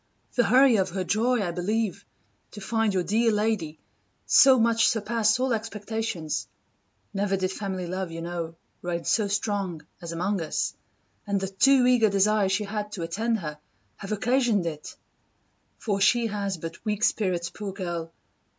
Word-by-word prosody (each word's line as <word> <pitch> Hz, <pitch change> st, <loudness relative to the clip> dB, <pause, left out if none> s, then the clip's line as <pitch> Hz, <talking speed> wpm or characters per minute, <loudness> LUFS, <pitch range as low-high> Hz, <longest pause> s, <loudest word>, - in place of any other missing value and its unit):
The 245 Hz, -, +3 dB
hurry 250 Hz, +1 st, +6 dB
of 190 Hz, -1 st, +1 dB
her 185 Hz, +1 st, -3 dB
joy, 225 Hz, +4 st, +1 dB
I 175 Hz, -, -2 dB
believe, 200 Hz, +3 st, -2 dB, 0.5 s
to 210 Hz, -, -8 dB
find 225 Hz, +1 st, 0 dB
your 185 Hz, -2 st, 0 dB
dear 225 Hz, +5 st, +2 dB
lady 210 Hz, -7 st, -1 dB, 0.5 s
so 265 Hz, -1 st, +7 dB
much 230 Hz, 0 st, +4 dB
surpass 220 Hz, 0 st, +1 dB
all 260 Hz, -1 st, +1 dB
expectations, 220 Hz, -6 st, -3 dB, 0.7 s
[never 195 Hz, 0 st, 0 dB
did 185 Hz, 0 st, -1 dB
family 190 Hz, -2 st, -4 dB
love, 185 Hz, +1 st, -3 dB
you 165 Hz, 0 st, -6 dB
know, 170 Hz, -1 st, -4 dB, 0.3 s
reign 170 Hz, -1 st, -3 dB
so 215 Hz, -3 st, +2 dB
strong 200 Hz, -5 st, -2 dB, 0.2 s
as 170 Hz, -1 st, -6 dB
among 185 Hz, +3 st, -1 dB
us,] 160 Hz, -, -2 dB, 0.5 s
and 200 Hz, -1 st, +1 dB
the 195 Hz, 0 st, -3 dB
too 255 Hz, +6 st, +4 dB
eager 245 Hz, -3 st, +4 dB
desire 200 Hz, 0 st, +2 dB
she 190 Hz, +2 st, +1 dB
had 210 Hz, 0 st, -4 dB
to 175 Hz, -, -4 dB
attend 220 Hz, +6 st, -1 dB
her, 150 Hz, -2 st, -6 dB, 0.4 s
have 195 Hz, -, -8 dB
occasioned 225 Hz, -2 st, +1 dB
it! 155 Hz, -2 st, -6 dB, 0.8 s
For 200 Hz, -3 st, -2 dB
she 240 Hz, +3 st, +4 dB
has 200 Hz, -3 st, -2 dB
but 165 Hz, +1 st, -8 dB
weak 210 Hz, 0 st, -2 dB
spirits, 180 Hz, -6 st, +1 dB
poor 205 Hz, -2 st, -6 dB
girl! 175 Hz, -4 st, -5 dB
200 Hz, 160 wpm, -26 LUFS, 180-225 Hz, 0.8 s, so